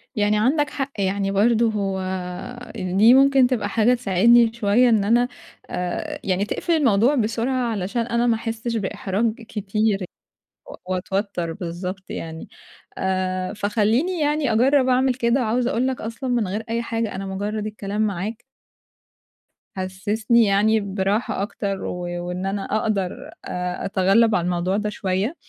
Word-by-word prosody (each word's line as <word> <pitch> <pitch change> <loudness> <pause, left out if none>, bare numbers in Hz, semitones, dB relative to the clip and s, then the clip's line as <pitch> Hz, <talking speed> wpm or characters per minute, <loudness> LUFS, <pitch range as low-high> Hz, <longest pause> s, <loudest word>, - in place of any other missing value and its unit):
يعني 210 0 +2
عندك 290 +6 +2
حق. 275 -2 -4
يعني 195 0 0
برضه 225 +3 +3
هو 195 -2 -2 0.8
ال 185 -3 -3
دي 225 +4 +7
ممكن 270 -1 +5
تبقى 220 -6 -1
حاجة 225 +4 +3
تساعدني 235 +1 +4
شوية 235 +2 +3
إن 220 -3 +3
أنا 240 +4 +3 0.4
آآ، 180 -1 -3
يعني 190 0 0
تقفل 335 +9 -1
الموضوع 250 -3 +3
بسرعة 240 +1 0
علشان 205 +3 -2
أنا 235 +1 0
ما 230 - +3
أحسّش 225 +1 -4
بإحراج 210 +1 -1
كتير 210 -2 -1 0.6
و - - -9 0.2
وأتوتّر 185 -2 -2
بالضبط 180 +3 -6
يعني. 160 0 -6 0.5
آآ 185 0 -1
فخلّيني 220 - 0
يعني 295 -4 +1
أجرّب 260 +4 +4
أعمل 255 0 +3
كده. 240 +1 +1
وعاوزة 240 +2 0
أقول 255 0 +1
لك 260 - -3
أصلًا 230 +4 -5
من 235 -5 +1
غير 210 +4 -3
أي 230 +1 0
حاجة، 230 -2 -3
أنا 195 +1 -4
مُجرّد 205 +2 -3
الكلام 210 -1 -4
معاك 210 +2 -2 1.4
حسّسني 210 +5 +1
يعني 210 +2 +3
براحة 200 +1 -1
أكتر، 200 -1 -3
و 180 - -4 0.3
وإن 180 +1 -4
أنا 195 0 -2 0.2
أقدر 195 -4 0 0.3
أ 180 0 -3
أتغلّب 200 +3 +3
على 175 - 0
الموضوع 180 +2 0
ده 210 0 -1
شوية. 200 - -2
215 Hz, 145 wpm, -22 LUFS, 195-235 Hz, 1.4 s, دي